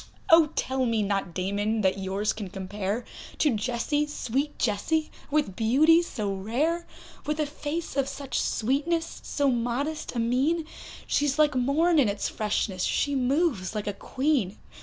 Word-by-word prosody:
Oh! 325 -2 +7
tell 260 -1 0
me 225 -2 +1
not 195 -4 -2
Damon, 205 +4 0
that 190 0 +1
yours 195 +2 -1
can 205 -4 -6
compare 200 +4 -3 0.3
To 300 - +3
Jessie, 255 +7 0
sweet 285 0 -2
Jessie, 280 +9 0 0.2
with 290 -10 0
beauty 290 - +5
so 210 - -3
rare; 280 - -1 0.4
With 300 +1 -1
a 305 - +2
face 300 +2 -4
of 275 -1 +1
such 275 -2 -3
sweetness, 300 +8 -1
so 285 -1 0
modest 250 +6 -2
a - - 0
mien, 270 +8 +1 0.4
She's 290 -1 +1
like 300 -1 +4
morn 295 +7 +3
in 250 -7 +4
its 200 - -1
freshness, 205 -3 -1
she 285 - +1
moves 265 - +1
like 210 - -2
a 205 - -2
Queen. 260 -3 -1
255 Hz, 155 wpm, -27 LUFS, 210-300 Hz, 0.4 s, Oh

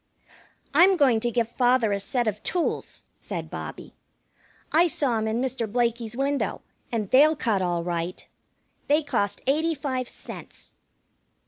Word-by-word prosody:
"I'm 365 +5 +6
going 260 -7 +4
to 240 - 0
give 235 -1 0
father 245 -2 +2
a 200 - 0
set 240 +4 0
of 210 0 -2
tools," 355 -2 -2 0.2
said - - -6
Bobbie. - - -7 0.8
"I 335 +3 +5
saw 260 -8 0
'em 220 - -1
in 220 +2 0
Mr. 250 -4 -2
Blakey's 235 -1 -1
window, 280 +1 -1 0.3
and 215 -4 -2
they'll 300 +4 +6
cut 220 -8 0
all 175 -2 0
right. 170 0 -4 0.6
They 300 +2 +3
cost 205 -7 -1
eighty 315 +5 +1
five 260 -3 -3
cents." - - -10
245 Hz, 145 wpm, -25 LUFS, 220-285 Hz, 0.8 s, I'm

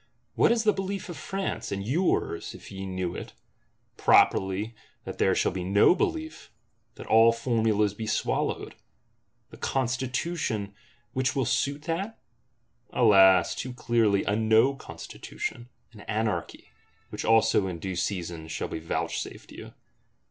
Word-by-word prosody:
What - - +4
is 235 -1 +2
the 210 -1 +4
Belief 195 0 -4
of 175 - -6
France, 190 - -4
and 100 0 -3
yours, 140 - 0
if - - -12
ye 95 0 -6
knew 95 -2 -3
it? - - -7 0.6
Properly 95 +4 +3 0.3
that - - -8
there - - +3
shall - - +1
be 90 -1 -4
no 100 - +5
Belief; 320 - -3 0.5
that - - -10
all 115 +1 +6
formulas 110 -3 +1
be 110 +1 -6
swallowed. - - -1 0.8
The - - -12
Constitution 125 - -2 0.4
which 130 0 0
will 135 -2 +1
suit 140 +5 0
that? 190 +7 -3 0.7
Alas, 95 -6 +5
too 125 0 -6
clearly, 115 -5 +2
a 105 - 0
No 110 +4 +4
Constitution, 120 -2 -7 0.2
an 105 - -14
Anarchy;—which 110 0 -5
also, 110 -3 +3
in 90 -2 -4
due 95 +3 -5
season, 85 -3 -3
shall 80 - -4
be 80 - -4
vouchsafed 80 +1 -4
you. - - -11
110 Hz, 135 wpm, -27 LUFS, 95-130 Hz, 0.8 s, all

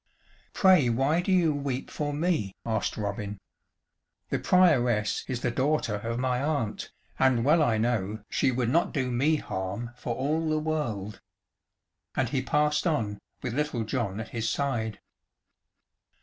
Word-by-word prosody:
"Pray 185 -10 +5
why 135 +8 +2
do 185 - -1
you 175 -4 +4
weep 140 -2 -3
for 145 -1 -2
me?" 145 - 0
asked 110 -2 -1
Robin; 105 0 -3 0.9
"the - - 0
Prioress 125 -12 +3
is 125 -2 -3
the 120 - 0
daughter 130 -4 0
of 115 +3 -3
my 125 0 0
aunt, 140 -8 -2 0.3
and 130 -3 +3
well 155 +3 +5
I 120 -7 +3
know 110 -2 -1
she - - +1
would 120 -2 0
not 165 +6 +1
do 130 -3 0
me 140 +6 +2
harm 100 -1 -4
for 120 -1 -4
all 155 +5 0
the 155 - +1
world." 130 -11 -3 0.9
And 130 -3 +1
he 130 +1 0
passed 150 +4 +1
on, 110 -10 -1 0.2
with 125 - -2
Little 145 -4 -1
John 110 -4 -2
at 110 - -6
his 115 -1 -2
side. 115 -7 -1
125 Hz, 150 wpm, -28 LUFS, 110-150 Hz, 0.9 s, Pray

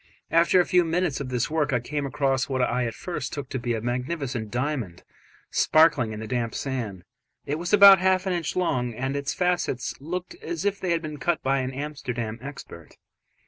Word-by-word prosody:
After 170 +3 +5
a 180 - +4
few 180 -2 +4
minutes 170 -2 0
of 130 - -5
this 125 +2 -1
work, 155 -2 +1
I 125 - +2
came 140 +4 -3
across 135 0 0
what 130 -1 -1
I 125 0 0
at 115 - -5
first 160 -7 -5
took 145 -2 -5
to 130 - -3
be 120 -1 -1
a 110 - -3
magnificent 125 -1 -3
diamond 125 - -3 0.5
sparkling 155 -8 +4
in 105 - -6
the 110 - -5
damp 115 0 -2
sand: 115 -10 -4 0.4
it 150 +2 -2
was 175 +1 -3
about 200 -2 +9
half 185 0 +2
an 190 - 0
inch 170 -3 -2
long, 125 -10 0
and 130 +3 -2
its 140 0 -2
facets 175 -8 0
looked 180 - -5
as 350 - -4
if 200 0 0
they 185 - -3
had 170 -1 +1
been 150 -1 -5
cut 170 +5 0
by 135 +1 +2
an 130 -1 -2
Amsterdam 130 -5 -4
expert. 135 - -10
140 Hz, 205 wpm, -25 LUFS, 125-170 Hz, 0.5 s, about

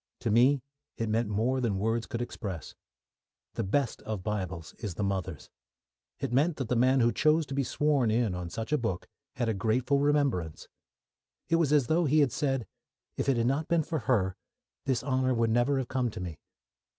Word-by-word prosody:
To 115 - 0
me 125 +4 +4 0.3
it 115 -2 -2
meant 110 0 +1
more 120 +6 +1
than 110 -5 0
words 115 +3 0
could 120 -3 -3
express. 95 -8 -6 0.8
The 115 - -2
best 120 +6 0
of 105 -4 -5
Bibles 95 -6 -4
is 100 -6 -5
the 105 - -2
mother's. 95 -5 -3 0.7
It 135 -4 -3
meant 150 +5 +2
that 130 -5 -3
the 125 - +2
man 130 +2 +4
who 120 0 +4
chose 155 +4 +3
to 135 - -7
be 140 0 +1
sworn 140 -3 +1
in 110 -2 +1
on 90 -1 -4
such 115 +7 -5
a 150 - +3
book 105 -7 -3 0.3
had 120 -2 -1
a 110 - +1
grateful 115 +7 +1
remembrance. 140 - 0 0.8
It 165 - +4
was 160 -4 +2
as 145 -4 +4
though 165 +7 +2
he 150 +2 +4
had 140 -4 +3
said, 135 -5 -1 0.5
"If - - -1
it 135 - +3
had 115 - +1
not 140 +5 0
been 170 -2 +2
for 160 +1 -2
her, 95 -7 +2 0.5
this 130 -2 +1
honour 130 -1 +1
would 115 -1 +2
never 120 +4 +2
have 130 -2 -2
come 130 -2 0
to 105 - -8
me." 85 -4 -6
120 Hz, 200 wpm, -29 LUFS, 105-140 Hz, 0.8 s, me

